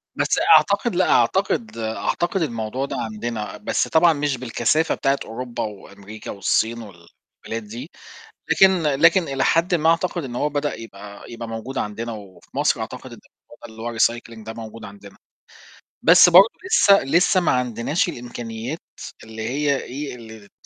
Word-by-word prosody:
بس - - +1 0.2
أعتقد 200 +1 +2
لأ، 185 - +2
أعتقد 200 - +1
أعتقد 110 - -2
الموضوع 120 -2 -3
ده - - -6
عندنا، 110 0 -5
بس - - -1
طبعًا 165 +1 +4
مش 145 -2 -1
بالكثافة 130 +6 0
بتاعة 135 0 0
أوروبا 120 +2 -5
وأمريكا 100 0 -9
والصين 115 +3 0
والبلاد 105 +3 -10
دي، 120 +9 -9 0.6
لكن 190 - +6
لكن 165 +5 +4
إلى 135 -3 -2
حدٍ 170 +2 +2
ما 160 -1 +2
أعتقد 170 0 0
إن 125 -3 -7
هو 145 +4 0
بدأ 145 0 -2
يبقى 100 -2 -11
يبقى 115 0 -7
موجود 115 +4 -6
عندنا 115 +3 -4
وفي 100 -4 -12
مصر - - +2
أعتقد - - -7
إن - - -12 0.2
الموضوع - - -19
ده - - -15
اللي 110 - -11
هو 115 0 -5
الrecycling 115 -1 0
ده 110 - -6
موجود 115 -1 -9
عندنا، 100 0 -13 0.8
بس 175 +2 +7
برضه 185 +5 +8 0.2
لسّه 200 - +5
لسّه 170 +7 +3
ما 175 - +2
عندناش 125 +7 0
الإمكانيات 120 +1 -6 0.4
اللي 110 0 -9
هي 140 +1 0
إيه، 140 +2 -6
اللي 110 -3 -12
ت - - -35
120 Hz, 160 wpm, -22 LUFS, 110-155 Hz, 0.8 s, برضه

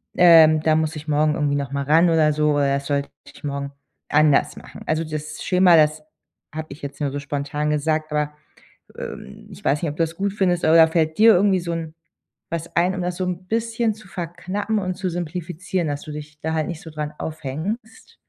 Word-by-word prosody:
ähm: 160 -3 +7
„Da 155 0 +3
muss 160 0 -1
ich 155 +1 -8
morgen 150 +1 +2
irgendwie 145 -2 0
nochmal 140 0 -2
ran 165 +4 +5
oder 160 -2 +4
so, 150 0 +2
oder 140 -1 +2
sollte 140 0 -2 0.2
ich - - -16
morgen 140 -1 -4 0.4
anders 150 -1 +3
machen.“ - - -11
Also 155 +1 0
das 155 0 -6
Schema, 180 -1 +5
das 155 0 +3 0.5
habe 155 0 -4
ich 140 - -10
jetzt 140 +1 -7
nur 140 -2 0
so 145 - -4
spontan 145 +1 -3
gesagt, 155 +1 -1
aber, 150 0 0 0.7
ähm, 65 - -8
ich - - -13
weiß 145 +2 +1
nicht, 165 - 0
ob 145 - -8
du 165 - +2
das 165 0 -6
gut 200 +1 -1
findest? 180 -4 +1
Oder 160 +1 +7
fällt 160 -1 0
dir 225 +1 +8
irgendwie 190 +1 +3
so 170 0 -4
'n 165 -2 -5 0.6
was 170 0 -5
ein, 180 +2 +3
um 185 - -3
das 180 0 -2
so 185 - -2
'n 180 0 -4
bisschen 230 0 0
zu 215 -2 -16
verknappen 185 +5 -3
und 185 -2 -2
zu 190 0 -2
simplifizieren, 175 0 -3
dass 145 0 -3
du 155 - -8
dich 150 0 -9
da 160 +1 -2
halt 155 -2 -1
nicht 170 -3 -6
so 160 - -10
dran 150 -1 -5
aufhängst? 160 - -6
160 Hz, 210 wpm, -22 LUFS, 150-180 Hz, 0.7 s, dir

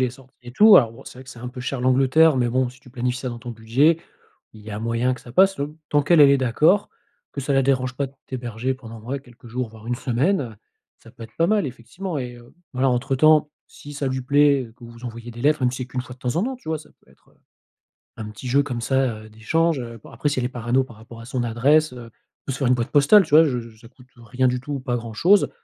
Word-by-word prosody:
les 125 -2 +1
sorties 130 +1 -18
et 120 - -10
tout. 210 - +7
Alors, 115 -5 +5
bon, 115 - -15
c'est 125 - -12
vrai - - -12
que 130 - -12
c'est 120 - -12
un 125 - -7
peu 125 0 -9
cher 125 +1 -4
l'Angleterre 135 +4 +4
mais 120 -1 +1
bon, 130 +1 +1
si 130 +1 -15
tu 125 - -17
planifies 125 0 -2
ça 130 - -4
dans 120 -1 -6
ton 120 +1 -8
budget, 125 +9 +2 0.6
il 110 - -13
y 105 +1 -10
a 105 - -5
moyen 115 +2 0
que 125 - -13
ça 120 - -13
passe 190 +8 +4
l 145 - -1 0.2
tant 145 0 +2
qu'elle, 160 +2 +4
elle 140 - +8
est 140 - +4
d'accord, 150 - +2 0.4
que 140 - -5
ça 140 +1 -2
la 135 0 +3
dérange 130 -1 0
pas 140 +1 -2
de 135 - -15
t'héberger 125 0 -3
pendant 115 -3 -11
ouais, 130 +4 -4
quelques 120 -3 -18
jours 120 0 -4
voire 110 0 -14
1 120 - -1
semaine, 130 +10 0
heu. 120 -5 -6 0.4
Ça 115 - -17
peut 115 - -13
être 110 - -16
pas 165 - +2
mal 210 -4 +1
effectivement 140 +8 -6
et 125 -1 -5
heu, 120 0 -17 0.2
voilà 130 +1 +1
entre 130 +2 0
temps 155 +1 +4 0.2
si 145 - -12
ça 140 -1 -3
lui 130 0 -2
plaît 140 0 +3
et 115 -2 -11
que 120 - -14
vous 115 +1 -12
envoyez 120 0 -7
des 120 +1 -9
lettres 150 -1 +2
même 125 - +3
si 130 -1 -5
qu'1 125 0 -4
fois 125 0 -9
de 130 - -27
temps 125 +5 -2
en 175 - +2
temps, 260 0 -3
tu 240 - -14
vois? 160 - -1
Ça 155 - -15 0.2
peut - - -26
être, - - -27
heu, - - -30 0.8
un 110 -1 -6
petit 110 +4 -9
jeu 140 +3 +3
comme 125 -4 -4
ça, 130 -2 0
heu, - - -14
d'échange, 155 +9 0
heu. 115 -2 -8
Bah, - - -14
après, 135 +6 -1
si 145 - -1
elle 125 - -1
est - - -1
parano 125 +1 0
par 115 - -14
rapport 115 +1 -13
à - - -11
son 125 0 -3
adresse, 140 +7 +2
heu, 120 -2 -10 0.3
on - - -84
peut 135 - -3
se 125 - -5
faire 135 - +1
une 125 - +4
boîte 120 -1 -3
postale, 150 +8 +6
tu - - -15
vois? 160 +2 +8
Je 125 -4 -1
je 115 -1 -12
ça 115 +1 -15
coûte, 125 0 -20
heu, 120 - -16
rien 130 +2 0
du 125 0 0
tout 145 +3 -6
ou 140 - -3
pas 125 -2 -2
grand-chose 120 - +2
125 Hz, 295 wpm, -22 LUFS, 120-140 Hz, 0.8 s, elle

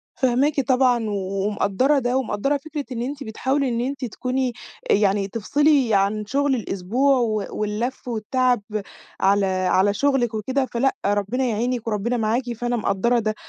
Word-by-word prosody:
فاهماكِ 275 +3 +2
طبعًا، 250 -4 +2
و - - -2 0.3
ومقدرة 210 +7 +2
ده، 245 0 0
ومقدرة 265 +3 0
فكرة 295 0 -6
إن 235 -2 -3
أنتِ 275 +3 -4
بتحاولي 265 +5 -1
إن 235 -1 -1
أنتِ 265 +1 -3
تكوني 255 +2 -2 0.4
يعني 200 -1 +3
تفصلي 270 +4 +2
عن 200 +2 +1
شغل 275 +4 +1
الأسبوع، 235 +6 +1
و 215 -4 0
واللف، 215 +5 -3
والتعب 245 +1 +1 0.6
على 200 +1 +3
على 185 +1 +2
شُغلِك 260 -1 +1
وكده. 260 +5 -1
فلأ، 260 +2 0
ربنا 205 +5 0
يعينِك، 235 +1 -1
وربنا 225 +3 -1
معاكِ، 235 +2 0
فأنا 240 +1 -2
مقدرة 235 +3 +1
ده. 215 -1 -1
240 Hz, 145 wpm, -22 LUFS, 210-265 Hz, 0.6 s, يعني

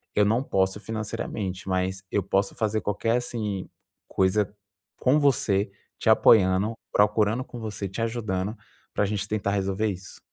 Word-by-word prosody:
eu 105 - +5
não 115 +6 +2
posso 95 -4 +1
financeiramente, 105 -3 -4
mas 95 0 0
eu 100 - +1
posso 100 +1 0
fazer 110 -1 0
qualquer 115 +3 0
assim 105 -6 -3 0.4
coisa 95 +1 +1 0.5
com 135 +4 +4
você, 105 -9 +2 0.3
te - - +1
apoiando, 105 -1 +5 0.2
procurando 105 +3 +3
com 120 - -9
você, 105 -3 -4
te 100 - -5
ajudando 110 -3 -2 0.4
para - - +1
a - - +1
gente 105 0 -2
tentar 105 -1 -1
resolver 100 +2 0
isso.". 95 -1 -6
105 Hz, 150 wpm, -26 LUFS, 95-110 Hz, 0.5 s, eu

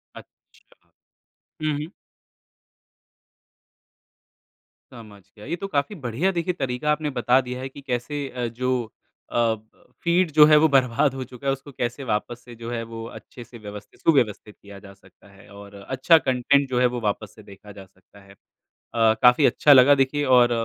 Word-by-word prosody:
अच्छा। - - -18 1.0
हुँ, 155 -1 0
हुँ। 150 +4 -6 3.0
समझ 110 -4 -13 0.2
गया। 105 - -12
ये 165 - -3
तो 195 +3 -6
काफ़ी 150 +3 -2
बढ़िया 140 - -2
देखिए 175 0 -2
तरीका 135 -1 -2
आपने 150 0 -1
बता 125 -1 +2
दिया 125 0 -7
है 135 - -5
कि 140 - -13
कैसे 140 +2 -4
अ, 125 -2 -4
जो 125 +2 -2 0.5
अ, - - -8
ब 110 -2 -3
फीड 170 0 +2
जो 150 0 +7
है, 155 0 +6
वो 155 +1 +5
बर्बाद 135 +1 +2
हो 130 - -4
चुका 130 +2 -10
है। - - +3
उसको 135 +1 -10
कैसे 125 +1 -4
वापस 120 +1 -3
से 120 -1 -12
जो 115 0 -8
है, 120 -1 -3
वो 115 0 -8
अच्छे 120 +1 -12
से 120 +1 -14
व्यवस्थित 105 -1 -11
सुव्यवस्थित 110 -8 +1
किया 100 -1 -13
जा 100 0 -14
सकता 95 - -23
है 95 0 -18
और 100 0 -13
अच्छा 130 - +2
कंटेंट 140 0 +1
जो 125 -1 0
है, 125 - +3
वो 125 0 -1
वापस 105 -1 -3
से 110 - -15
देखा 100 +1 -14
जा 100 -1 -12
सकता 95 +2 -23
है। 100 0 -17 0.4
अ, 115 -1 0
काफ़ी 125 +4 +5
अच्छा 145 - +5
लगा 135 +2 +7
देखिए 135 +2 0
और 120 -1 +4
125 Hz, 180 wpm, -23 LUFS, 115-140 Hz, 3.0 s, जो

